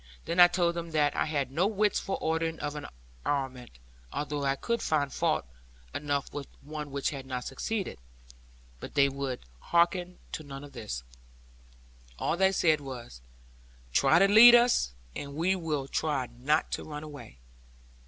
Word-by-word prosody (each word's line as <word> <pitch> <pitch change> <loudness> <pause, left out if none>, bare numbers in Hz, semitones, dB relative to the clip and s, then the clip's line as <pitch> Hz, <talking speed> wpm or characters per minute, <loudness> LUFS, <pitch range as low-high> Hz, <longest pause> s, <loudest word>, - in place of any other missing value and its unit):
Then 170 +2 -1
I 175 - +11
told 175 -1 +1
them 170 -1 -4
that 150 -2 +2
I - - +1
had 140 -4 -1
no 170 +8 +2
wits 210 -1 +1
for 195 - -3
ordering 160 0 -1
of 145 0 -3
an 150 - -6 0.4
armament, 130 - -3 0.3
although 145 -1 -3
I 135 0 +2
could 235 - -2
find 145 -3 0
fault - - 0 0.5
enough 145 -1 -2
with 145 -1 -6
the - - -26
one 150 0 -6
which 140 -1 -1
had 135 -2 -7
not 125 -1 -3
succeeded. 195 - -3 0.8
But - - -9
they 140 -1 +5
would 135 -2 -4 0.2
hearken 175 - +1
to - - -4
none 140 -2 -9
of 145 - -11
this. 105 - -5 1.1
All - - 0
they 190 +2 +3
said 160 -5 +3
was 120 - -8 0.7
'Try - - +5
to 195 +3 +6
lead 230 +4 +10
us; 235 - +3 0.2
and 140 0 -6
we 175 +5 +2
will 155 -6 -2
try 145 -3 -1
not 135 +6 0
to - - -3
run 150 -1 -7
away.' 145 - -10
150 Hz, 170 wpm, -29 LUFS, 135-170 Hz, 1.1 s, I